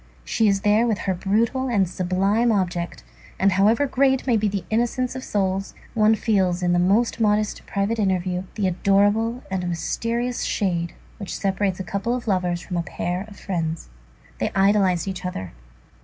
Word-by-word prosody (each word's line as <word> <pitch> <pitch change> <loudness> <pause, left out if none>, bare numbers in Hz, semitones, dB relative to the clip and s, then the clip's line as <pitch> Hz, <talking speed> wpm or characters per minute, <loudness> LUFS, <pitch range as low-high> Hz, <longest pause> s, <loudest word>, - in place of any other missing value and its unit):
She 220 - +2
is 195 -1 +2
there 210 +4 +3
with 220 -3 +1
her 190 - -1
brutal 225 +8 0
and 205 -7 +2
sublime 195 +6 +1
object; 175 -4 -2 0.3
and 195 +1 +3
however 210 +8 +3
great 265 -1 +2
may 245 -3 +3
be 215 -1 +2
the 195 -3 -3
innocence 240 +3 0
of 260 - -5
souls, 195 -1 -1 0.2
one 220 -1 +4
feels 190 -5 +1
in 175 0 +2
the 175 - +3
most 210 +7 +2
modest 210 -1 +1
private 205 +3 -1
interview, 185 -2 0
the 210 - -1
adorable 205 +6 +2
and 180 -2 -1
mysterious 230 +8 -2
shade 170 -4 -1 0.2
which 200 - -5
separates 195 -1 -1
a - - -2
couple 200 +6 -2
of 245 -2 -6
lovers 180 -3 0
from 180 -1 -4
a - - +1
pair 175 +2 -3
of 210 - -13
friends. 165 - -3 0.5
They - - 0
idolized 195 -3 +3
each 190 0 -4
other. 95 - -5
200 Hz, 170 wpm, -23 LUFS, 185-225 Hz, 0.5 s, one